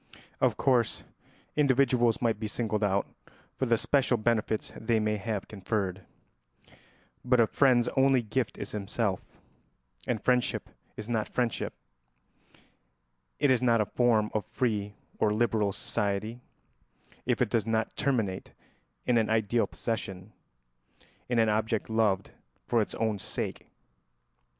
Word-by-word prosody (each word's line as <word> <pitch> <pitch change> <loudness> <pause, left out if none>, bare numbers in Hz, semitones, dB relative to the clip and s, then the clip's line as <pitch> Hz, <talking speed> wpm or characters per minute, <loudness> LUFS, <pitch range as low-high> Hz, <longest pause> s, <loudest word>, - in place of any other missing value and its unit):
Of - - +2
course, 120 -4 +2 0.5
individuals 130 -5 +3
might 115 -3 +1
be 110 - -2
singled 110 -1 -2
out 100 -1 +2 0.5
for 130 - -1
the 115 -1 +4
special 135 0 +2
benefits 110 -1 0
they 110 0 +1
may 105 0 0
have 105 -1 -3
conferred; 100 -2 -2 1.2
but 125 0 +3
a 115 - +7
friend's 125 +1 +3
only 135 -2 +3
gift 115 +2 -2
is - - -5
himself, 105 -1 -1 0.9
and 115 - 0
friendship 125 +1 0 0.3
is 105 - -6
not 110 -3 -1
friendship, 120 -3 -1 1.6
it 145 -2 +3
is 125 - +3
not 120 -2 +4
a 105 - +2
form 110 -2 +2
of 110 - 0
free 105 -1 -2 0.2
or 105 - +3
liberal 110 -3 +1
society, 105 +5 -2 0.9
if - - +1
it - - +1
does 115 -2 +1
not 110 0 0
terminate 110 -9 -1 0.5
in 120 -2 +3
an 110 - 0
ideal 110 +1 +2
possession, 100 -3 -5 1.0
in 120 - +1
an 115 -1 +4
object 110 +1 0
loved 105 -4 +1 0.3
for 120 -2 +2
its 105 - -3
own 110 -3 -1
sake. - - -4
110 Hz, 130 wpm, -29 LUFS, 105-120 Hz, 1.6 s, a